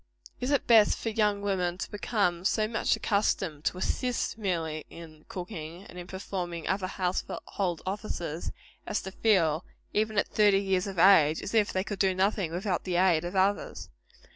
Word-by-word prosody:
Is 250 - -2
it 285 -3 +2
best 225 -3 +6
for 225 - -3
young 210 -2 +1
women 180 -3 0
to - - -5
become 200 -5 0
so 215 +2 +2
much 225 0 +1
accustomed 190 -7 0
to - - 0
assist, 245 +6 -1
merely, 165 -7 -2
in 155 -2 -12
cooking, 175 -2 -7
and 180 - -11
in 175 - -8
performing 180 -3 -5
other 190 -1 0
household 185 -1 -3
offices, 185 -5 -4 0.4
as 210 - -1
to 190 - -6
feel, 175 -7 +2 0.3
even 215 0 0
at - - +3
thirty 205 -2 +4
years 190 0 0
of 195 -2 -6
age, 165 -4 +6
as 200 - -5
if 215 -2 +3
they 185 - 0
could 205 -1 -5
do 190 -2 +2
nothing 190 -2 +1
without 180 +1 -2
the 180 -2 -2
aid 175 -3 +3
of 175 +2 -5
others? 195 +2 0
190 Hz, 175 wpm, -29 LUFS, 175-205 Hz, 0.4 s, best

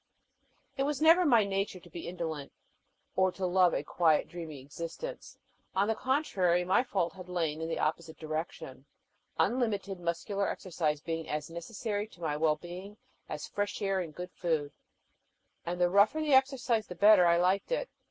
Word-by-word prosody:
It - - 0
was 285 0 0
never 330 +3 +6
my 235 -6 +6
nature 195 -1 -2
to 175 - -16
be 170 - -7
indolent, 160 -5 -4 0.6
or 190 0 +3
to 190 - -3
love 180 -1 +4
a - - -1
quiet, 160 -3 +2
dreamy 165 -5 -7
existence: 170 - -7 0.4
on 195 +2 +3
the 225 - +2
contrary, 195 - +1
my 185 +6 +4
fault 180 -9 -1
had 185 0 -11
lain 160 -3 -1
in 160 - -3
the 165 - -2
opposite 160 +1 -2
direction, 155 -4 -5 0.5
unlimited 205 -6 0
muscular 180 +4 -1
exercise 155 -5 -2
being 165 0 -4
as 150 +1 -3
necessary 205 +4 -4
to 200 - -19
my 155 -3 -1
well 155 0 +2
being 180 +6 -9 0.3
as - - -5
fresh 205 0 -2
air 195 -1 0
and 165 -5 -5
good 180 0 -6
food, 160 -5 -1 1.0
and 175 +1 -2
the 175 - +4
rougher 200 - +4
the 305 -2 +1
exercise 260 -5 +3
the 180 - -7
better 200 -1 +7
I 170 0 +5
liked 185 - +1
it. - - 0
180 Hz, 170 wpm, -31 LUFS, 165-205 Hz, 1.0 s, better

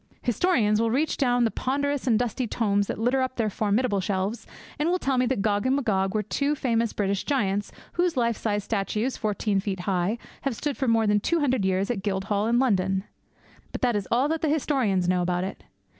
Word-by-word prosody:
Historians 230 - +2
will 230 - +2
reach 285 +7 +1
down 245 -3 +2
the 225 - +2
ponderous 285 +1 -1
and 225 -3 +4
dusty 245 +1 -1
tomes 205 -3 +1
that - - -3
litter 245 +4 +1
up 260 0 -2
their 220 -3 0
formidable 210 0 +1
shelves, 195 +4 -2 0.3
and 305 +3 +1
will 360 - +2
tell 270 -6 0
me 250 0 +2
that 235 -6 0
Gog 205 +2 +1
and 260 - +3
Magog 195 -7 0
were 215 - +1
two 280 +8 0
famous 230 -4 0
British 200 -1 -1
giants 205 -8 0 0.2
whose 350 -4 0
life 235 -2 +2
sized 205 -2 -2
statues, 220 +4 -1
fourteen 210 -1 0
feet 190 -2 -3
high, 190 +3 0 0.2
have 275 -4 -2
stood 290 +3 -2
for 265 - -2
more 225 -1 +3
than 205 0 +3
two 335 +11 0
hundred 260 -6 +1
years 190 +3 +1
in 245 - -2
the - - -5
Guildhall 200 +1 -1
in 235 +1 +2
London. 190 -6 +1 0.7
But - - -5
that 245 -3 +3
is 205 -2 -2
all 250 +4 +2
that 320 0 -1
the 315 - +1
historians 255 - +1
know 180 0 +2
about 180 0 0
it! 190 - -6
225 Hz, 220 wpm, -26 LUFS, 200-260 Hz, 0.7 s, and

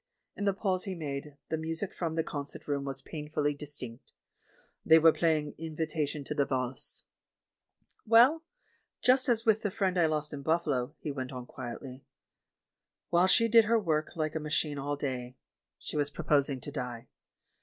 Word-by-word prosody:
In 205 - -3
the 200 - +3
pause 185 -2 -1
he 190 -2 -3
made, 145 -2 -5
the 160 - +1
music 165 +4 -3
from 165 -2 -3
the 160 - +1
con 145 -2 -4
cert - - -11
room 140 -1 -1
was 135 -1 -4
painfully 150 -1 -2
distinct. 140 -5 -7 0.7
They 160 - +7
were 165 0 +7
playing 155 -3 +1
the 165 - -5
"Invitation 155 -2 -2
to 145 - -4
the 145 -1 +2
Valsc." 130 -2 -3 1.0
"Well, 245 +8 +6 0.6
just 260 +1 +4
as 230 -1 +2
with 220 -1 +4
the 210 - 0
friend 190 -1 0
I 165 - +5
lost 150 -1 -2
in 140 - -5
Buf 160 +4 +1
falo," 135 0 -1
he 150 - -3
went 130 -1 -5
on 125 -2 -6
quietly, 130 +1 -8 1.1
"while 175 +2 +5
she 230 +4 +5
did 230 0 +6
her 230 +2 +3
work 155 -7 0
hke 155 -2 -1
a 160 - -1
machine 150 -1 -1
all 145 +1 -2
day, 130 -3 -4 0.4
she - - -6
was 145 -1 +1
proposing 140 -2 +1
to 145 - -7
die. 125 -4 -5
150 Hz, 180 wpm, -30 LUFS, 140-170 Hz, 1.1 s, They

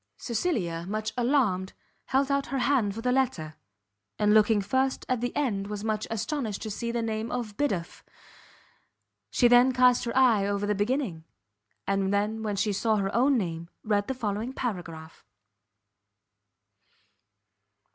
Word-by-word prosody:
Cecilia, 190 - -2
much 215 +1 -3
alarmed, 235 -8 +1 0.3
held 270 +1 +1
out 280 0 0
her 270 +2 -2
hand 245 -6 +1
for 225 - -5
the 250 +1 +1
letter; 250 -13 0 0.6
and 210 0 +3
looking 215 0 +5
first 260 +6 0
at 255 -2 0
the 245 - -1
end 210 -9 -1
was 205 0 -5
much 215 -1 -1
astonished 225 -1 -3
to 215 - -4
see 235 +3 -3
the 235 -1 -1
name 220 0 -2
of 235 -4 -4
Biddulph. 195 -12 -2 1.3
She 245 - +4
then 245 +2 +6
cast 250 -1 +4
her 235 - -2
eye 230 -7 +4
over 200 0 -1
the 210 - +1
beginning, 205 - -1 0.6
and 195 -1 0 0.3
when 210 -2 -2
she 205 +1 0
saw 220 +3 +1
her 195 -1 -1
own 260 +3 +3
name, 170 -5 -3
read 205 -1 0
the 265 - -2
following 220 +1 -3
paragraph. 170 -10 -6
220 Hz, 145 wpm, -27 LUFS, 200-250 Hz, 1.3 s, then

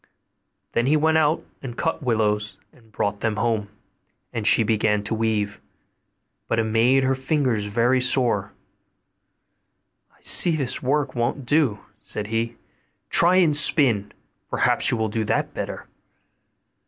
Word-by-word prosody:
Then 120 +2 0
he 155 +2 +3
went 160 +1 +2
out 155 +1 0 0.2
and 120 -3 -8
cut 165 0 -2
willows, 105 -5 -1 0.2
and 115 -3 -23
brought 100 0 -2
them 110 -1 -1
home, 105 -1 -1 0.6
and 115 -2 -2
she 115 - +6
began 105 -1 0
to 105 - -2
weave; 110 -2 -2 0.9
but 115 - -1
it 115 - +2
made 115 +5 +2
her 130 0 +1
fingers 130 -5 -1
very 120 +5 +1
sore. 125 -1 +1 1.6
'I - - -30
see 170 -2 +3
this 135 -5 -3
work 140 +1 -1
won't 120 +2 -2
do,' 135 -6 +1 0.2
said 105 - -6
he: 115 +1 -2 0.6
'try 175 +2 +4
and 170 -5 +3
spin; 125 -9 +4 0.4
perhaps - - +2
you 120 - 0
will 110 0 -1
do 110 +1 -2
that 110 - -1
better. - - -6
120 Hz, 140 wpm, -23 LUFS, 110-135 Hz, 1.6 s, she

